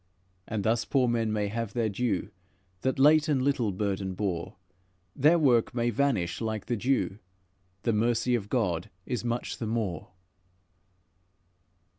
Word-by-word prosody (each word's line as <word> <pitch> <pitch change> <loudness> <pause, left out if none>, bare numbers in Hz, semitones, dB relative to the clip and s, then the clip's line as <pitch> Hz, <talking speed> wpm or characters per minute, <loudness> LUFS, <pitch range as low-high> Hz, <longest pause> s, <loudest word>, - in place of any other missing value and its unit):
And 110 -3 -2
thus 115 +2 +2
poor 130 -3 +2
men 115 -2 +1
may 105 -1 0
have 115 0 -3
their 115 -2 +1
due, 110 0 -1 0.5
That 130 - 0
late 150 +3 +5
and 145 -3 +2
little 130 -5 +1
burden 95 -1 -2
bore; 95 -1 -3 0.6
Their 150 +5 +5
work 125 -7 +3
may 120 0 +1
vanish 115 -9 0
like 110 -2 -3
the 120 - -1
dew, 115 -3 0 0.6
The 115 - +1
mercy 120 +3 +1
of 105 -4 -1
God 95 -9 0 0.2
is 125 -2 -3
much 120 0 -3
the 115 - -3
more." 105 -7 -2
115 Hz, 145 wpm, -28 LUFS, 105-125 Hz, 0.6 s, late